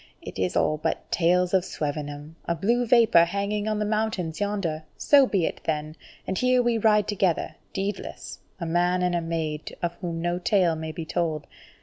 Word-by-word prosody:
It - - -9
is 90 -1 0
all 155 - +2
but - - -3
tales 180 +1 +2
of 190 -2 +4
Swevenham, 145 -1 -5
a 170 - 0
blue 235 +8 +1
vapour 225 -8 +6
hanging 200 +3 -2
on 215 -1 0
the 210 - 0
mountains 210 -6 -1
yonder! 195 -7 -1 0.2
So 280 -2 +5
be 190 -7 +1
it - - -4
then! 155 -1 -2 0.3
And 190 - -2
here 250 0 +3
we 235 -1 +1
ride 210 -1 +3
together, 190 -5 0 0.2
deedless, 195 0 -5 0.2
a 170 - -3
man 175 +2 +1
and 180 0 +1
a 175 - +1
maid 160 -2 -3
of 170 0 0
whom 170 -3 -3
no 175 +1 -1
tale 180 -3 +2
may 160 0 -5
be 160 +1 -6
told. 160 -2 -2
175 Hz, 190 wpm, -25 LUFS, 160-210 Hz, 0.3 s, vapour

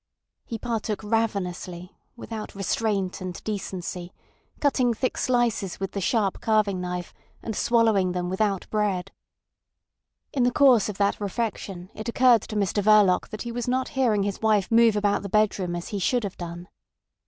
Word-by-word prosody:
He 230 - -5
partook 220 -2 -3
ravenously, 190 -5 -2 0.2
without 225 -3 -7
restraint 195 -1 -1
and 185 -1 -5
decency, 185 -4 -5 0.5
cutting 255 -5 +2
thick 255 +3 -1
slices 240 -7 0
with 195 -1 -3
the 200 - -3
sharp 200 0 0
carving 210 -4 +1
knife, 180 -1 -4 0.3
and 220 - -4
swallowing 220 -6 +3
them 180 0 -2
without 195 +1 -1
bread. 205 -4 -1 1.2
In 275 - 0
the 245 - +4
course 250 -6 +5
of 200 - -5
that 200 +1 +1
refection 200 -3 -4
it 215 +2 -5
occurred 245 -2 +5
to 215 - -8
Mr 205 0 +1
Verloc 205 -3 +4
that 215 - -6
he 240 - -5
was 240 0 -4
not 255 +1 0
hearing 235 -7 +1
his 200 -1 -3
wife 215 -3 +2
move 230 -1 +5
about 205 -1 +1
the 200 - -6
bedroom 200 -4 +1
as 175 - -5
he 205 - -3
should 240 +5 +1
have 200 -2 -4
done. 175 0 -7
210 Hz, 165 wpm, -25 LUFS, 185-230 Hz, 1.2 s, course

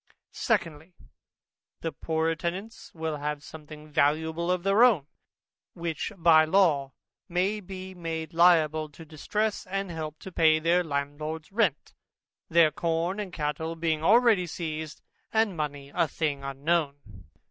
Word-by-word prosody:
Secondly, 170 -5 -2 0.9
The 165 - -2
poorer 160 0 -1
tenants 185 +7 -5
will 160 -2 -3
have 150 0 -4
something 155 -1 -11
valuable 160 +4 +1
of 180 -1 0
their 195 +4 +4
own, 210 - +5 0.7
which 170 +3 -3
by 165 -2 +6
law 155 -6 +2 0.4
may 185 +5 0
be 190 -1 -8
made 165 -3 -5
liable 160 -3 +4
to 150 +3 -13
a - - -14
distress, 205 +8 -2
and 195 -1 -3
help 155 -2 -5
to 190 - -8
pay 160 -2 +4
their 170 +3 +2
landlord's 150 +2 -4
rent, 195 - 0 0.6
their 165 -2 +5
corn 170 +5 -1
and 200 -3 -4
cattle 160 0 -3
being 160 -1 -1
already 220 -2 +5
seized, 160 -2 -5 0.3
and 220 -4 +2
money 145 -3 -4
a 165 - +2
thing 145 -2 -2
unknown. 140 +2 0
165 Hz, 135 wpm, -27 LUFS, 155-180 Hz, 0.9 s, by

